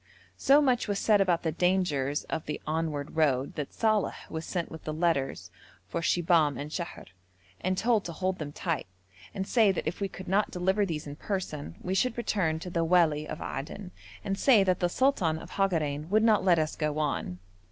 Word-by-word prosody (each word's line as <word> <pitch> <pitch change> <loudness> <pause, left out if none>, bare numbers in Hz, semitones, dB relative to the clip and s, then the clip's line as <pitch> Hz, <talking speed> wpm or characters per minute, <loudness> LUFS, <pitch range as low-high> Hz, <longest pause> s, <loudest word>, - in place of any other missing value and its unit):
So 285 +2 +5
much 255 -4 +2
was 205 -1 -1
said 210 0 +3
about 175 -3 +2
the 160 - 0
dangers 155 -5 +1
of 160 - -5
the 150 - -3
onward 155 -2 -2
road 140 -4 +2
that 145 -2 -5
Saleh 215 -3 0
was 160 0 -5
sent 175 -3 -3
with 160 - -9
the 155 - -4
letters 160 -5 -1 0.4
for 170 - -3
Shibahm 165 -5 +2
and 145 +2 -6
Sheher 170 +1 -5 0.5
and 185 0 -1
told 225 -1 +2
to 170 - -4
hold 185 +2 -2
them 145 -2 -5
tight, 165 - -3 0.4
and 195 - -3
say 220 -2 +4
that 190 - -3
if 165 +6 -3
we 200 - +1
could 190 0 -10
not 195 +3 +2
deliver 190 +3 +1
these 155 -4 -4
in 145 0 -8
person 155 - -4
we 185 - -2
should 235 +5 +1
return 185 -9 0
to 180 - -6
the 170 -1 +1
wali 160 -3 +3
of - - -6
Aden 180 +7 -6 0.3
and 195 0 -2
say 235 -8 +6
that 185 -2 +1
the 175 - +1
sultan 190 - +2
of - - -10
Hagarein 155 -6 0
would 215 +2 +3
not 220 -2 +4
let 180 -3 +4
us 155 -1 0
go 150 -1 -1
on. 145 -11 -2
175 Hz, 205 wpm, -29 LUFS, 155-195 Hz, 0.5 s, say